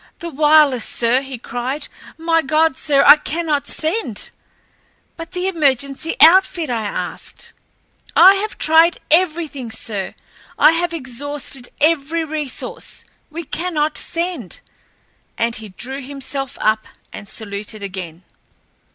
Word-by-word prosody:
"The 340 0 -7
wireless, 295 -4 +4
sir!" 240 +2 +2
he 270 -2 -8
cried. 245 +5 -4 0.3
"My 330 0 +2
God, 310 +1 +2
sir, 280 -1 +2
I 300 - +10
cannot 300 -2 -2
send." 315 - -2 0.8
"But 330 +1 -9
the 365 0 -1
emergency 280 -3 0
outfit?" 340 -3 +5
I 230 -2 -1
asked. 205 - -5 0.6
"I 375 +3 +9
have 430 +2 -4
tried 325 +2 +4
everything, 315 -7 +1
sir. 215 -3 -4 0.4
I - - +7
have 340 +1 0
exhausted 275 -2 -5
every 320 +1 +1
resource. 300 -3 -5 0.2
We 330 +2 -6
cannot 310 -2 -1
send," 335 - -3 0.8
and 230 0 0
he 215 -1 -9
drew 260 +8 -6
himself 275 0 -5
up 215 0 +1 0.3
and 200 - -9
saluted 210 0 -7
again. 185 -3 -7
290 Hz, 120 wpm, -19 LUFS, 245-330 Hz, 0.8 s, I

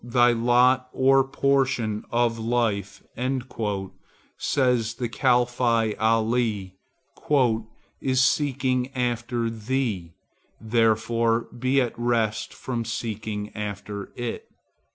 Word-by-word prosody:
"Thy 120 0 +4
lot 125 +2 +3
or 135 +1 +4
portion 135 -5 0
of 120 -1 +1
life," 110 -4 -1 1.3
said 125 -4 +2 0.2
the 120 - -2
Caliph 120 0 +1
Ali, 110 -3 +1 1.3
"is 130 -1 +1
seeking 130 -3 +1
after 120 -1 -1
thee; 110 -7 -2 0.4
therefore 115 +1 +2
be 130 +3 +1
at 120 -3 0
rest 115 -3 0
from 120 -3 -4
seeking 110 -2 -4
after 100 -1 -5
it." 120 -1 -5
120 Hz, 90 wpm, -25 LUFS, 110-125 Hz, 1.3 s, Thy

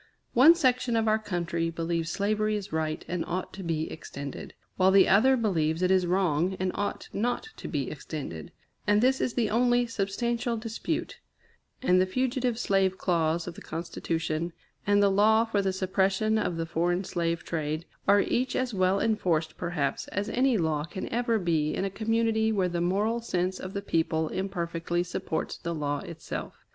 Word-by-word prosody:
One 290 +8 +8
section 255 -6 +2
of 225 -1 +2
our 215 0 +3
country 170 -5 -2
believes 165 0 -2
slavery 215 +1 0
is 205 -4 -5
right 155 -1 -2
and 175 -1 -2
ought 180 +2 -3
to 195 - -7
be 160 -3 -2
extended, 140 -3 -7 0.2
while 185 0 +4
the 190 0 +6
other 260 +7 +5
believes 170 -7 0
it 180 - +3
is 185 -2 +3
wrong 180 0 +1
and 185 0 0
ought 205 0 -3
not 245 - -1
to - - -7
be 140 -6 -2
extended; 140 - -6 0.4
and 210 0 +4
this 260 +3 +3
is 245 - -1
the 225 -4 +1
only 245 +1 +3
substantial 230 +2 -1
dispute; 225 0 -4 0.6
and 185 -6 +4
the 185 - +2
fugitive 250 +2 0
slave 195 -4 +1
clause 170 -2 +1
of 175 - -6
the - - -12
Constitution, 165 0 -3 0.3
and 205 0 +4
the 200 - +4
law 220 +3 +4
for 215 -3 0
the 195 -1 0
suppression 190 +3 +1
of 175 -5 -1
the 165 - -1
foreign 175 +3 0
slave 170 -2 -2
trade, 155 0 -3 0.2
are 200 +1 +6
each 250 +5 0
as 255 -2 -1
well 185 0 +2
enforced, 175 -8 0
perhaps, 165 -6 -2
as 205 +1 -3
any 255 -1 +2
law 160 -4 0
can 190 +4 -6
ever 235 -1 +1
be 160 -5 0
in 195 - -1
a 195 - -2
community 220 +1 +1
where 195 -4 +1
the 175 -1 -2
moral 205 +6 +1
sense 185 -4 -1
of 185 +1 -7
the 200 - -4
people 160 -3 0
imperfectly 175 -2 -2
supports 175 -2 -3
the 170 -1 -3
law 145 -1 -1
itself. 165 +2 -7
190 Hz, 180 wpm, -28 LUFS, 165-220 Hz, 0.6 s, One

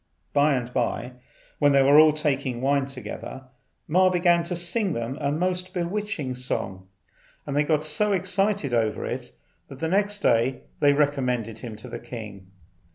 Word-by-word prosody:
By 145 0 +4
and 125 -1 -4
by, 120 0 -1 0.5
when 145 -1 +4
they 135 -1 +5
were 140 +2 +7
all 155 0 +7
taking 140 -5 -1
wine 135 +1 +1
together, 130 0 -7 0.4
Ma 185 +4 +4
began 175 -1 +3
to 175 - -2
sing 175 +3 +1
them 115 +1 -3
a 140 -1 0
most 180 +4 -1
bewitching 175 -6 -2
song, 100 -7 -3 0.6
and 140 - -4
they 145 - +3
got 150 0 +1
so 155 +8 +1
excited 195 -5 0
over 110 -2 0
it - - -5 0.4
that 135 +4 -4
next 205 +4 +1
day 125 - +1 0.2
they 145 -1 +5
recommended 125 -6 0
him 115 -3 -7
to 110 - -10
the - - -6
king. 110 -5 -9
145 Hz, 160 wpm, -25 LUFS, 125-175 Hz, 0.6 s, were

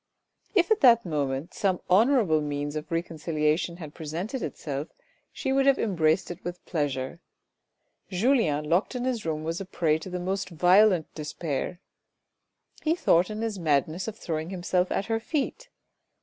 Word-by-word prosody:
If 365 0 +3
at 435 - +4
that 235 -5 +6
moment 145 -2 -2
some 190 -3 0
honourable 205 - +4
means 145 0 -3
of 155 0 -5
reconcilia 160 -2 0
tion 170 -2 -4
had 155 -4 -9
presented 170 - -4
itself, 145 -1 -4 0.4
she 265 -2 -2
would 270 0 +3
have 275 - +5
embraced 170 -3 +1
it 175 - -9
with 175 0 -6
pleasure. 145 -2 -2 0.9
Julien 185 - +2
locked 175 - +1
in 245 - -2
his 240 -8 -2
room 155 -1 -2
was 165 +3 -3
a - - -5
prey 160 -4 +1
to 175 - -8
the 180 0 -3
most 190 +2 -2
violent 180 +1 +4
despair. 155 +1 -4 1.0
He 320 +1 +2
thought 180 - +3
in 215 +1 -4
his 220 -4 -3
madness 155 - 0
of 220 -1 -5
throwing 160 -4 -3
himself 180 0 0
at 195 - 0
her 225 +1 0
feet. 310 - -3
175 Hz, 165 wpm, -27 LUFS, 155-215 Hz, 1.0 s, that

